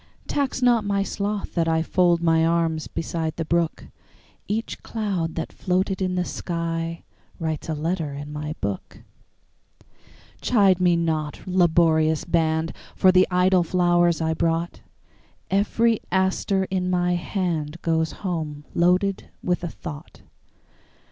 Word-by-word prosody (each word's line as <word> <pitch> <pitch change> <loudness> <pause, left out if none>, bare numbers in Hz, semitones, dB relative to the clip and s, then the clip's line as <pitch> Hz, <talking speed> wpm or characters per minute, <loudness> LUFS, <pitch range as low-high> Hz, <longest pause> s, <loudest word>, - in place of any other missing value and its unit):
Tax 270 -2 -1
not 240 -3 +4
my 200 -1 0
sloth 200 0 -3
that 165 -2 +1
IFold 170 +2 +2
my 165 -1 +4
arms 165 -1 +1
beside 160 -1 -3
the 165 - -3
brook; 170 0 0 0.6
Each 220 +2 -3
cloud 195 -8 -2
that 165 - -4
floated 190 +1 -1
in 185 -1 0
the 180 - +1
skyWrites 165 -2 -4
a 160 - -1
letter 160 0 -2
in 145 +1 -7
my 150 +1 -4
book. 100 -2 -5 1.4
Chide 195 -6 +3
me 175 -1 +4
not, 160 -3 -1
laborious 160 -3 +3
band, 160 -1 +1 0.2
For 185 - +5
the 185 0 +5
idle 180 0 +4
flowers 175 -1 +2
I 160 0 +1
brought; 165 +1 -1 0.7
Every 220 +3 +2
aster 190 +1 +1
in 185 -1 0
my 180 -1 +1
handGoes 165 -3 -1
home 155 -5 -3
loaded 180 +3 +2
with 180 0 0
a 175 - -2
thought. 150 -3 -9
170 Hz, 125 wpm, -24 LUFS, 160-185 Hz, 1.4 s, For